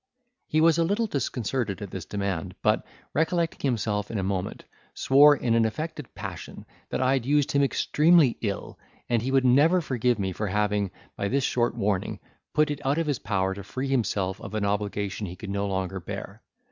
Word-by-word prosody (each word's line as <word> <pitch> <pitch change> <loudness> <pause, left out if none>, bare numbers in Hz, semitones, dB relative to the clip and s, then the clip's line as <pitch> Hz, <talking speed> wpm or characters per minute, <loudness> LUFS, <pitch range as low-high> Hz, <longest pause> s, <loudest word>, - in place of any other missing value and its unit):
He 155 - +2
was 165 0 +5
a - - +4
little 205 +7 +1
disconcerted 125 - -2
at 100 -3 -7
this 95 -2 -6
demand; 100 -5 -3
but, - - +3 0.3
recollecting 165 +1 0
himself 105 -4 -1
in 115 - -3
a 95 - -1
moment, 95 -1 -3 0.3
swore 145 +2 +6
in 120 -4 0
an 115 0 +4
affected 150 +4 -4
passion, - - -7 0.2
that - - -1
I 130 +1 +3
had 130 -2 -1
used 145 -1 +2
him 140 - +3
extremely 150 0 +4
ill, 100 -3 -4 0.3
and 120 -2 +2
he 125 - -2
would 135 -1 +3
never 145 +8 +5
forgive 125 -6 0
me 95 -2 -1
for 105 +3 -3
having, 105 0 0 0.3
by 100 - -2
this 135 +6 +1
short 120 -2 +1
warning, 100 -4 -1 0.3
put 150 0 +2
it 145 - -5
out 140 +3 +1
of 165 - +1
his 145 -4 -1
power 95 -2 0
to 100 +1 -8
free 130 +6 -4
himself 100 -7 0
of 110 -2 -7
an 105 -1 0
obligation 100 0 -2
he 90 - -7
could 100 +2 -7
no 100 0 -1
longer 95 -1 -2
bear. 85 - -7
115 Hz, 195 wpm, -26 LUFS, 100-140 Hz, 0.3 s, swore